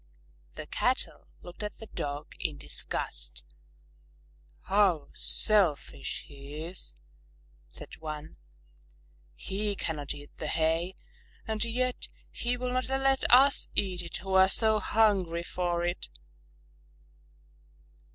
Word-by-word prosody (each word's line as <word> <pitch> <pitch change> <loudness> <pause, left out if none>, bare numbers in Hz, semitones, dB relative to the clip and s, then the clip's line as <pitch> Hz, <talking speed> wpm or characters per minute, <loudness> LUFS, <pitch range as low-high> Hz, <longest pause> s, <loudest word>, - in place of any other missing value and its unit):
The - - -6
Cattle - - -1 0.2
looked 175 - -10
at 210 -1 -4
the 220 - -10
Dog 145 -7 -5
in - - -2
disgust. - - +1 1.2
"How 190 -7 +2
selfish 170 - +1
he 145 +2 -8
is!" 175 +3 -3 0.7
said - - -6
one. 155 -1 -7 1.0
"He 205 +1 -3
cannot 150 -6 -3
eat 145 0 -13
the 155 - -4
hay 165 +4 0 0.5
and 220 -1 -1
yet 250 +2 -1 0.2
he 245 +1 -1
will 250 0 -2
not 255 +1 0
let 270 0 +2
us 270 +3 +7
eat 185 -3 +1
it 175 - -4
who 190 0 -5
are 190 0 +7
so 220 +1 +5
hungry 195 -6 +2
for 175 -1 -1
it!" 175 - -3
185 Hz, 110 wpm, -29 LUFS, 155-220 Hz, 1.2 s, us